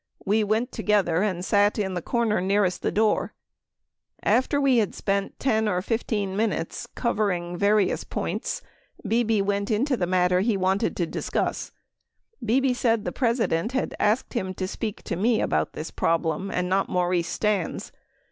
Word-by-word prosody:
We 215 +2 +2
went 220 +4 0
together 200 -6 +1
and 185 -4 -1
sat 205 +1 +3
in 195 -3 -1
the 175 - -2
corner 230 -1 0
nearest 195 -1 +1
the - - 0
door. 215 0 +1 0.9
After 260 +3 +2
we 275 -3 +3
had 215 -4 +1
spent 200 0 -1
10 220 -5 +1
or 180 -3 +1
15 210 -3 -1
minutes 205 -6 -2
covering 195 -7 -1
[var 205 +4 +3
ious] 195 - 0
points, - - -3 0.4
Bebe 225 -3 +2
went 200 0 -1
into 255 +6 +1
the 180 -6 -1
matter 180 0 +3
he 210 +1 +1
wanted 190 +1 +1
to 175 - +1
discuss. - - -2 0.7
[Bebe] 255 +3 +2
said 230 -3 +1
the - - -1
President 230 -5 0
had 265 - -1
asked 215 +4 +1
him 190 -6 -2
to 185 - -3
speak 215 +2 -5
to - - -3
me 220 +5 +2
about 80 0 0
this 155 - -6
problem 165 +3 0
and 180 -1 -1
not 190 +2 +1
Maurice 175 -1 +1
Stans. 205 -5 -1
205 Hz, 165 wpm, -25 LUFS, 185-225 Hz, 0.9 s, sat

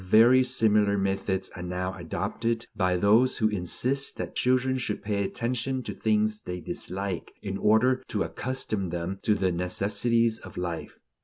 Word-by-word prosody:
Very 115 +7 +6
similar 105 -5 +3
methods 95 -1 -1
are 90 - -7
now 90 +1 -3
adopted 115 +6 -2
by 90 -2 +1
those 110 +7 +4
who 110 -2 +2
insist 125 +8 -1
that - - -5
children 130 +1 +2
should 105 -5 -3
pay 100 -1 0
attention 125 +5 -2
to - - -5
things 110 0 +1
they 90 0 -5
dislike, 95 +1 -3
in 95 -1 -3
order 125 +5 +3
to - - -1
accustom 110 -7 -2
them 85 +3 -4
to 105 - +2
the 95 -3 +1
necessities 105 +6 +1
of 95 - -12
life. 85 -2 -4
105 Hz, 155 wpm, -27 LUFS, 95-115 Hz, -, Very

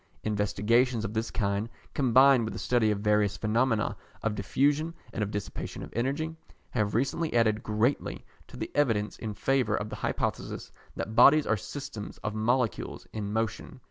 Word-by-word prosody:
Investigations 110 +3 +1
of 105 - -4
this 115 +1 -1
kind, 100 +1 -1 0.2
combined 130 -1 +5
with 110 - -4
a - - -4
study 120 -3 +2
of 105 -1 0
various 105 -1 +2
phenomena 115 0 +1 0.3
of 110 -1 +1
diffusion 145 - +1 0.2
and - - -3
of 105 - 0
dissipation 105 -1 -5
of - - -10
energy, 140 +7 -1 0.4
have 105 -1 0
recently 140 +6 0
added 110 -2 +3
greatly 110 +6 -1 0.2
to - - -12
the - - -4
evidence 115 -8 +1
in 110 -2 -4
favour 125 -1 +1
of 105 +1 -3
the - - -5
hypothesis - - -3 0.2
that 110 - -4
bodies 155 +4 +7
are 110 - +2
systems 115 +1 -7
of 105 - -2
molecules 115 +1 0
in 105 -2 -3
motion. 110 -1 -3
110 Hz, 165 wpm, -29 LUFS, 105-130 Hz, 0.4 s, bodies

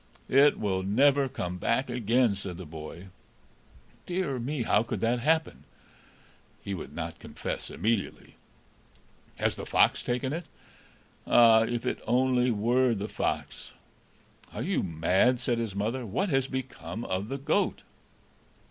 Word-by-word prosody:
"It 140 +2 +5
will 95 -3 0
never 135 +8 +3
come 90 -8 -4
back 130 +7 +1
again," 120 -1 +2
said 95 -3 -6
the 95 - -8
boy. 80 +4 -9 1.0
"Dear 175 -8 -1
me! 130 +2 -2
How 105 - +3
could 115 - -4
that 120 +2 +1
happen?" 155 - 0 1.0
He 100 - -4
would 90 - -7
not - - -5
confess - - -6
immediately. 110 -2 -2 1.0
"Has - - 0
the - - -6
fox - - +3
taken 130 +3 -2
it?" 170 +1 -4 0.8
"Ah, 115 -1 +6
if 120 0 -3
it - - -1
only 125 +1 +3
were 120 +3 +2
the 100 +1 -4
fox!" - - -4 0.8
"Are - - -4
you - - 0
mad?" 95 +9 +2
said 120 -2 -1
his 110 -4 -3
mother. 115 +6 -2
"What 130 - -1
has 135 -3 +1
become 120 -7 -5
of 95 +2 -2
the 135 - -3
goat?" 140 - 0
120 Hz, 140 wpm, -28 LUFS, 100-130 Hz, 1.0 s, Ah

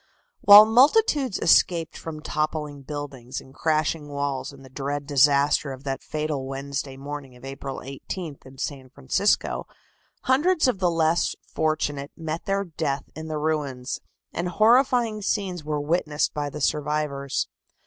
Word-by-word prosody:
While 205 +1 +10
multitudes 265 - +4
escaped 165 -1 +3
from 155 -2 -7
toppling 155 -2 -2
buildings 135 -3 -6
and 130 - -15
crashing 155 0 0
walls 140 -1 -3
in 140 -1 -14
the - - -12
dread 145 +1 -3
disaster 140 0 +3
of 130 0 -9
that 135 -2 -3
fatal 150 -3 -3
Wednesday 135 0 -4
morning 140 -2 -7
of 125 +1 -13
April 135 0 -6
18th 140 +3 -7
in 130 0 -14
San 135 -1 -5
Francisco, 140 +10 0 0.5
hundreds 310 +5 +3
of 240 -7 0
the 180 -2 +2
less 165 0 +1
fortunate 145 -3 -1
met 160 0 -4
their 195 0 0
death 150 -5 -3
in 160 +1 -7
the 155 -1 -3
ruins, 145 -5 -2 0.3
and 175 +1 -2
horrifying 230 +2 +3
scenes 190 -5 -2
were 150 0 -2
witnessed 150 0 0
by 145 -1 -2
the 150 +1 -7
survivors. 150 -2 -1
150 Hz, 145 wpm, -25 LUFS, 140-170 Hz, 0.5 s, While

